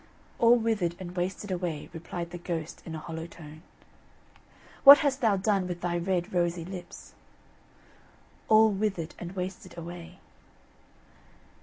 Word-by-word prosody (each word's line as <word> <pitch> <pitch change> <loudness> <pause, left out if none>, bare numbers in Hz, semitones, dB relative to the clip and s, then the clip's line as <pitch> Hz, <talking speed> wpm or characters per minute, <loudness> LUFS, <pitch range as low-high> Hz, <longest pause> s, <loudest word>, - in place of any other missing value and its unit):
"All 235 +1 +6
withered 220 -7 0
and 180 -1 -8
wasted 190 +3 -3
away," 175 -5 -3
replied 170 +1 -6
the 175 - -7
ghost, 165 -2 -5
in 160 - -5
a - - -5
hollow 160 +1 -6
tone. 155 -2 -12 1.2
"What 280 0 +12
hast 275 -1 0
thou 215 -4 +3
done 195 -1 +1
with 175 -1 -5
thy 175 -1 -1
red 180 0 -1
rosy 175 -1 0
lips?" 185 -1 -9 1.4
"All 220 0 +6
withered 195 -5 -2
and 175 +1 -7
wasted 185 -1 -6
away." 170 +1 -9
180 Hz, 135 wpm, -28 LUFS, 170-195 Hz, 1.4 s, What